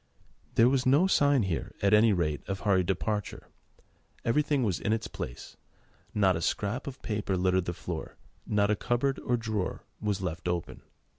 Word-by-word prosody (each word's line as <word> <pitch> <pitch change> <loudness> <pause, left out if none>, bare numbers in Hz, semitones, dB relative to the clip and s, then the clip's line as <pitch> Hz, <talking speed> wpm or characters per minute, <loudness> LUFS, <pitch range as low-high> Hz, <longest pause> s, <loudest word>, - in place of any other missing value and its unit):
There 115 -2 +6
was 130 0 +2
no 145 +8 +5
sign 145 - +3
here, 90 -4 -3
at 100 +1 +4
any 110 +1 +6
rate, 75 -6 0
of 95 -1 -3
hurried 95 -4 +2
departure. 105 +2 -2 0.8
Everything 145 +2 +2
was 95 -7 0
in 110 - 0
its 110 - -2
place, - - -7 0.5
not 95 -4 +3
a 80 - -3
scrap 105 - -1
of 135 -1 -8
paper 105 -4 -1
littered 90 0 +2
the 85 - -2
floor, 85 -2 -6 0.3
not 105 0 +2
a - - +3
cupboard 125 +6 0
or 120 - 0
drawer 110 -5 -3 0.2
was 105 -2 0
left 85 -2 -4
open. 85 -1 -3
105 Hz, 170 wpm, -29 LUFS, 90-120 Hz, 0.8 s, There